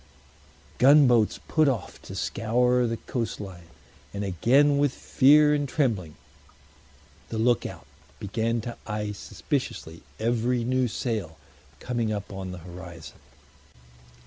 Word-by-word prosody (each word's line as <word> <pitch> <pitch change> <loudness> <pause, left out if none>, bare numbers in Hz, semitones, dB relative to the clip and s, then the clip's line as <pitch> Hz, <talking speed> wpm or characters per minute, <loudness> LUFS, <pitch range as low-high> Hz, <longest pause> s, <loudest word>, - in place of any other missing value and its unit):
Gunboats 125 -5 +5
put 155 -2 +3
off 120 -9 -2
to - - -9
scour 125 +2 +1
the 115 0 -2
coast 115 -1 -4
line; 90 -4 -9 0.5
and 100 - -3
again 135 - +3
with 145 -2 +3
fear 150 +3 +4
and 145 -2 -1
trembling 105 - -1 1.1
the 115 - -4
look 120 +1 +2
out - - -11 0.3
began 115 +3 -1
to 120 +1 -7
eye 105 -1 -3
suspiciously 80 -4 -4 0.2
every 120 +1 0
new 130 +1 +1
sail 105 -9 -3 0.4
coming 120 -3 -2
up 100 -1 -5
on 95 -1 -6
the 90 - -7
horizon. 85 -2 -10
115 Hz, 120 wpm, -26 LUFS, 100-125 Hz, 1.1 s, Gunboats